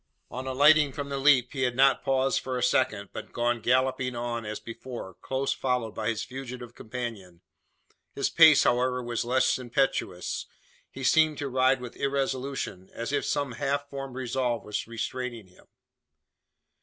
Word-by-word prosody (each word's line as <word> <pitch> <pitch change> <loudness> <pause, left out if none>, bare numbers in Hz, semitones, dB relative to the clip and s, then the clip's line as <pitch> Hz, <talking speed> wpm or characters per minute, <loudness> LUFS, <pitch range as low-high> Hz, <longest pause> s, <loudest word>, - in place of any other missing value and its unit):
On 130 +1 -5
alighting 145 +2 +5
from 145 -1 -5
the 140 -1 -2
leap, 135 -3 +4
he 135 - -3
had 125 -1 +1
not 135 +1 +4
paused 135 0 +2
for 130 -1 -4
a 125 - -2
second, 125 -5 +1
but - - -7
gone 120 0 0
galloping 130 +1 +1
on 120 -2 -3
as 105 0 -4
before, 115 -4 -8
close 135 +9 -2
followed 125 -4 -1
by 110 0 -2
his 110 -2 -2
fugitive 125 -2 -8
companion. 110 -9 -7 0.7
His 140 - +1
pace, 160 -3 +7
however, 125 +1 +1
was 120 -1 -2
less 130 +2 +2
impetuous. 120 -7 -1 0.4
He 135 - -9
seemed 155 +3 +4
to 145 - -3
ride 130 0 +3
with 125 -1 -8
irresolution, 135 -8 -2
or - - -25
as 115 +4 -4
if 145 - 0
some 140 -3 -1
half 140 +3 -2
formed 135 -2 -6
resolve 125 -2 -1
was 105 0 -4
restraining 115 0 -4
him. 90 - -21
130 Hz, 165 wpm, -27 LUFS, 120-135 Hz, 0.7 s, pace